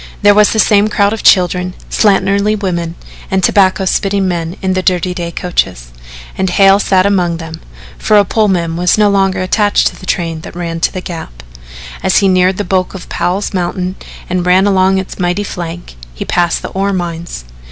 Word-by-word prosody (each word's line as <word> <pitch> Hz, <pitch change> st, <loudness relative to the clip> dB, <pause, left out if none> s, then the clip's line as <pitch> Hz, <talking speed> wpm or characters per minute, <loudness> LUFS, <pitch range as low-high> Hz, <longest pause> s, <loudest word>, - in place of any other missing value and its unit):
There 205 Hz, 0 st, +6 dB
was 210 Hz, 0 st, +4 dB
the -, -, -2 dB
same 210 Hz, -1 st, +4 dB
crowd 205 Hz, -1 st, +1 dB
of 225 Hz, -, -5 dB
children, 180 Hz, 0 st, +2 dB, 0.2 s
slatternly 200 Hz, 0 st, +2 dB
women 170 Hz, -4 st, -3 dB, 0.3 s
and 190 Hz, 0 st, 0 dB
tobacco 190 Hz, 0 st, +3 dB
spitting 195 Hz, +1 st, 0 dB
men 170 Hz, 0 st, -3 dB
in 190 Hz, -1 st, -1 dB
the 185 Hz, -, 0 dB
dirty 180 Hz, -1 st, 0 dB
day 175 Hz, -1 st, -4 dB
coaches, 95 Hz, -, -3 dB, 0.4 s
and 190 Hz, 0 st, -1 dB
Hale 195 Hz, +2 st, +4 dB
sat 190 Hz, -2 st, +2 dB
among 180 Hz, -4 st, +1 dB
them 165 Hz, 0 st, -9 dB, 0.4 s
for 215 Hz, -, +3 dB
a 205 Hz, -, +4 dB
Pullman 185 Hz, -6 st, 0 dB
was 180 Hz, +3 st, +2 dB
no 210 Hz, -1 st, +3 dB
longer 195 Hz, -1 st, +1 dB
attached 205 Hz, +2 st, +1 dB
to -, -, -15 dB
the 185 Hz, -, -12 dB
train 165 Hz, -3 st, -2 dB
that -, -, -11 dB
ran 170 Hz, -1 st, -4 dB
to -, -, +1 dB
the 185 Hz, -, -5 dB
Gap. 110 Hz, -, -8 dB, 0.6 s
As 190 Hz, -, +2 dB
he 200 Hz, -, +3 dB
neared 185 Hz, 0 st, +2 dB
the 205 Hz, -, -2 dB
bulk 185 Hz, +1 st, -1 dB
of 190 Hz, -, -9 dB
Powell's 180 Hz, +5 st, -2 dB
mountain 180 Hz, 0 st, -2 dB, 0.3 s
and 180 Hz, 0 st, -1 dB
ran 180 Hz, +2 st, +3 dB
along 190 Hz, -1 st, +2 dB
its 190 Hz, +1 st, -5 dB
mighty 180 Hz, +3 st, 0 dB
flank, 175 Hz, -, -7 dB, 0.2 s
he -, -, -5 dB
passed 175 Hz, -1 st, 0 dB
the -, -, -5 dB
ore 195 Hz, +1 st, -1 dB
mines. 170 Hz, -, -5 dB
185 Hz, 195 wpm, -13 LUFS, 175-200 Hz, 0.6 s, There